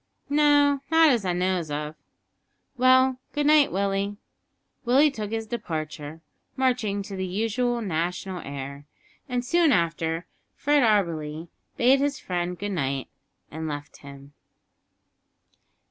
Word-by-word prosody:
"No, 290 Hz, -1 st, +4 dB
not 320 Hz, 0 st, +6 dB
as 230 Hz, -6 st, 0 dB
I 180 Hz, -, +1 dB
knows 180 Hz, -2 st, -1 dB
of." 150 Hz, +1 st, -4 dB, 0.8 s
"Well, 255 Hz, 0 st, +4 dB
good 295 Hz, 0 st, 0 dB
night, 300 Hz, -1 st, +5 dB
Willie." 200 Hz, +1 st, -1 dB, 0.7 s
Willie 275 Hz, +5 st, +4 dB
took 215 Hz, -6 st, -5 dB
his 225 Hz, 0 st, -3 dB
departure, 160 Hz, -8 st, -5 dB, 0.3 s
marching 245 Hz, -7 st, 0 dB
to 200 Hz, -1 st, -7 dB
the 190 Hz, -, -3 dB
usual 225 Hz, +5 st, -1 dB
national 180 Hz, +1 st, -3 dB
air, 140 Hz, +1 st, -7 dB, 0.4 s
and 250 Hz, -1 st, -2 dB
soon 335 Hz, +3 st, +3 dB
after 165 Hz, -3 st, 0 dB, 0.3 s
Fred 290 Hz, 0 st, +2 dB
Auberly 170 Hz, -, 0 dB, 0.3 s
bade 255 Hz, +3 st, +5 dB
his 285 Hz, 0 st, 0 dB
friend 180 Hz, 0 st, -3 dB
good 205 Hz, +2 st, -4 dB
night 135 Hz, -6 st, -2 dB, 0.4 s
and 160 Hz, +1 st, -5 dB
left 145 Hz, -1 st, -6 dB
him. 140 Hz, 0 st, -13 dB
200 Hz, 125 wpm, -25 LUFS, 160-255 Hz, 0.8 s, not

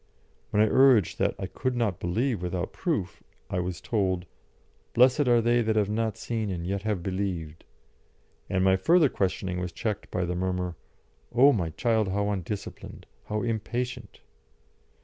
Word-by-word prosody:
When 105 Hz, -, +3 dB
I -, -, +3 dB
urged 125 Hz, -5 st, +4 dB
that -, -, +1 dB
I -, -, -4 dB
could 125 Hz, +7 st, -3 dB
not 110 Hz, -7 st, 0 dB
believe 110 Hz, +5 st, -1 dB
without 90 Hz, 0 st, -3 dB
proof, 140 Hz, -, -2 dB, 0.3 s
I 90 Hz, -, 0 dB
was 90 Hz, -1 st, -3 dB
told, 95 Hz, -5 st, -1 dB, 0.7 s
"Blessed 130 Hz, +3 st, +5 dB
are 120 Hz, -1 st, +5 dB
they 120 Hz, +1 st, +3 dB
that 110 Hz, -1 st, 0 dB
have 105 Hz, -1 st, +1 dB
not 110 Hz, 0 st, -1 dB
seen 110 Hz, -3 st, -3 dB
and 85 Hz, -3 st, -4 dB
yet 100 Hz, +2 st, -2 dB
have 105 Hz, -4 st, -2 dB
believed"; 90 Hz, -5 st, -3 dB, 0.9 s
and 95 Hz, -1 st, +1 dB
my 95 Hz, 0 st, +4 dB
further 165 Hz, -, +4 dB
questioning 95 Hz, -3 st, -1 dB
was 90 Hz, -1 st, -3 dB
checked 105 Hz, +4 st, -4 dB
by 90 Hz, -1 st, -1 dB
the 90 Hz, -, -2 dB
murmur, 90 Hz, -1 st, -2 dB, 0.6 s
"O 140 Hz, +4 st, +7 dB
my 85 Hz, -7 st, -1 dB
child, 110 Hz, +5 st, +1 dB
how 100 Hz, +2 st, 0 dB
undisciplined! 100 Hz, +1 st, -6 dB, 0.2 s
how 105 Hz, 0 st, -2 dB
impatient!" 120 Hz, 0 st, -3 dB
100 Hz, 160 wpm, -27 LUFS, 90-115 Hz, 0.9 s, O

